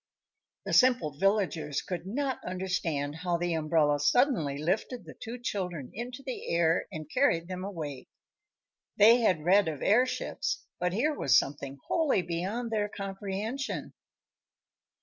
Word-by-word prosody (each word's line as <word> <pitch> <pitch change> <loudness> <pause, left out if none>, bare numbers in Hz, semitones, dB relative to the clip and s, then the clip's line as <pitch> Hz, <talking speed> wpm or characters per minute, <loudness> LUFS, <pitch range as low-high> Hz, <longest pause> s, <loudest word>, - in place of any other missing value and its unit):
The - - -3
simple 245 - +4
villagers 185 -8 +1
could 180 -1 -5
not 265 +5 -2
understand 175 -6 -2
how 175 +1 -1
the 175 0 -1
umbrella 155 -2 +2
suddenly 150 - +2
lifted 190 - -2
the - - -10
two 230 +2 -7
children 180 - -4
into 250 +4 -6
the 260 -2 -5
air 170 0 +2
and 155 -1 -6
carried 170 - +2
them 185 0 -5
away. 155 -9 -6 0.9
They 225 +3 +8
had 185 -10 +1
read 195 +2 +5
of 150 -3 -4
airships, 250 +5 +1
but 180 0 0
here 285 +10 +1
was 130 - +4
something 140 0 -2
wholly 300 - +2
beyond 195 +8 -3
their 210 -2 0
comprehension. 205 +6 -4
185 Hz, 135 wpm, -29 LUFS, 160-230 Hz, 0.9 s, They